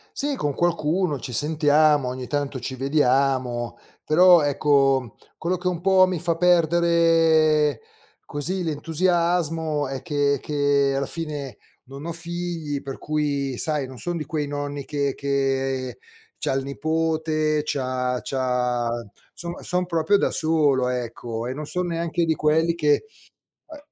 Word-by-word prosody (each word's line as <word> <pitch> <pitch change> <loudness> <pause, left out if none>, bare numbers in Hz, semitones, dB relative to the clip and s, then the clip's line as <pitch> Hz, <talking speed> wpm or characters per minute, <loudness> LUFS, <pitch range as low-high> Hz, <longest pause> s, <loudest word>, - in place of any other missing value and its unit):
Sì, 285 0 -1
con 145 - -2
qualcuno 170 -2 0
ci 125 - -7
sentiamo, 150 +1 +3
ogni 125 0 -4
tanto 145 -2 -2
ci 130 +2 -5
vediamo, 130 -3 +1 0.3
però 175 +2 +6
ecco 135 -4 +2 0.2
quello 180 +3 -1
che 180 +1 -4
un 180 -2 -1
po' 190 0 +5
mi 185 -2 -2
fa 170 +1 0
perdere 165 -4 +3 0.4
così 180 +6 -3
l'entusiasmo 165 -1 0
è 135 0 -5
che 145 -3 +1
è - - -7
che 145 -1 +1
alla 140 0 0
fine 150 -4 -6 0.3
non 135 +3 -10
ho 170 - -3
figli, 170 -3 -4
per 135 -1 -7
cui 145 -3 -2
sai, 150 -1 -1
non 130 0 -10
son 175 -1 -3
di 155 - -4
quei 150 0 -2
nonni 145 -1 -4
che 140 -2 -1
che 135 -2 -1 0.4
c'ha - - -1
il 135 0 -1
nipote, 155 +1 0
c'ha 130 -3 -1
c'ha 125 -2 -1 0.4
insomma, 170 0 -7
son 180 0 -1
proprio 175 +3 +2
da - - 0
solo, 150 -5 +2
ecco, 120 -2 -4
e 125 - -3
non 150 +3 -6
son 180 +2 -2
neanche 170 0 -1
di 160 - +2
quelli 160 +2 +2
che, 150 - +2 0.6
ehm, 310 - -10
150 Hz, 145 wpm, -23 LUFS, 135-165 Hz, 0.6 s, però